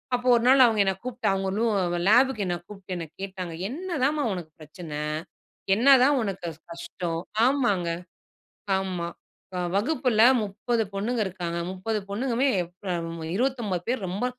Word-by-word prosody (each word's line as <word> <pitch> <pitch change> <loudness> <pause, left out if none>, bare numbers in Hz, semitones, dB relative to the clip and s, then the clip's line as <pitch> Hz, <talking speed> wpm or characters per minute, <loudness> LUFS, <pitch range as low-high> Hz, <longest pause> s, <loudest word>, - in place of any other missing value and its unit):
அப்போ 245 +1 -3
ஒரு 235 - +1
நாள் 260 0 +8
அவங்க 225 -3 +2
என்ன 195 - +2
கூப்பிட்டு 250 0 -3
அவங்க 195 0 -1
ரூ 230 - +2 0.4
லேபுக்கு 245 -2 +4
என்ன 175 - 0
கூப்பிட்டு 195 -2 -8
என்ன 170 - -4 0.2
கேட்டாங்க 190 -3 -5 0.2
"என்னதாம்மா 300 -1 -1
உனக்கு 170 -4 -7
பிரச்சனை? 155 0 -8 0.8
என்னதான் 270 +4 +6
உனக்கு 195 -5 -4
கஷ் 160 0 -12
கஷ்டம்?" 170 0 -4 0.3
ஆமாங்க, 240 -10 +2 0.9
ஆமா. 185 -3 -3 0.5
அ - - -1 0.2
வகுப்பில 250 0 +2 0.2
30 225 +3 -1
பொண்ணுங்க 230 +5 -1
இருக்காங்க. 175 -2 -4
30 210 +4 -2
பொண்ணுங்கமே 245 +5 0 0.4
ப் 190 - -4
அம் 165 -1 -5
29 230 -7 -1
பேர் 245 -6 -1
ரொம்ப 195 +7 -2
210 Hz, 140 wpm, -26 LUFS, 180-250 Hz, 0.9 s, நாள்